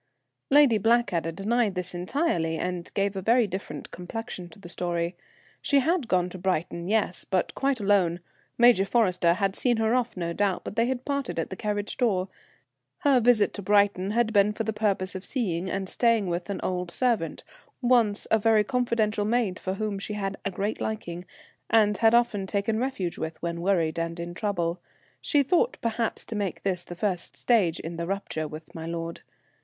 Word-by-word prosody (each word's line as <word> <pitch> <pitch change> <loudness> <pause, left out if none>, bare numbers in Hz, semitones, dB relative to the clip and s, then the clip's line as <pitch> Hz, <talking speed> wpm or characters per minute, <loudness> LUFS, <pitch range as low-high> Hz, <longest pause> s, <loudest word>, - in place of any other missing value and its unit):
Lady 270 -6 +6
Blackadder 225 -7 +2
denied 210 +3 0
this 180 0 -4
entirely, 175 - 0
and 180 0 -4
gave 200 0 0
a 190 - -3
very 235 +4 +4
different 185 -6 -6
complexion 180 -1 -6
to 225 - -16
the 195 - -11
story. 175 0 -2 0.5
She 285 - +2
had 315 -1 +1
gone 180 -3 +2
to 185 - -9
Brighton; 170 -1 -1
yes, 210 -3 0
but 185 -2 -1
quite 270 -2 0
alone. 195 -4 +2 0.4
Major 240 -5 +6
Forrester 185 -5 +3
had 195 0 0
seen 245 -2 +2
her 225 +1 +2
off, 245 -4 0
no 170 -1 -2
doubt, 200 0 0
but - - -6
they 230 +1 +2
had 255 -1 -3
parted 280 -7 -2
at 165 - -2
the - - -3
carriage 205 +1 -3
door. 195 -7 +1 0.7
Her 280 -5 +4
visit 235 -3 +4
to 205 - -6
Brighton 200 -1 +3
had 225 +1 +1
been 205 0 +4
for 225 - -3
the 220 0 -2
purpose 200 -3 0
of 185 - -6
seeing 185 -9 -2
and 195 0 -2
staying 230 0 +2
with 175 +1 -3
an 200 - -3
old 180 -1 -2
servant, 225 -4 0 0.4
once 240 -5 +2
a 220 - +5
very 220 0 +4
confidential 230 -4 0
maid 215 -3 0
for 190 0 -3
whom 210 -1 -2
she 210 - -5
had 195 -1 -3
a - - -1
great 200 +3 -3
liking, 180 -5 -4 0.4
and 210 -2 +4
had 225 0 +5
often 235 -5 +2
taken 205 +3 0
refuge 230 -9 -2
with 160 0 -4
when 170 0 -3
worried 170 -4 +1
and 165 0 -3
in 170 0 -5
trouble. 175 -3 -1 0.4
She 290 -2 +2
thought, 360 - +2
perhaps, 230 0 -2
to 225 - -6
make 200 -3 -3
this 185 -3 0
the 175 - -9
first 180 -1 -2
stage 195 -9 +2
in 165 +1 -6
the 170 0 -3
rupture 185 -5 -3
with 155 +1 -10
my 165 0 -6
lord. 165 0 -5
200 Hz, 190 wpm, -26 LUFS, 180-225 Hz, 0.7 s, Lady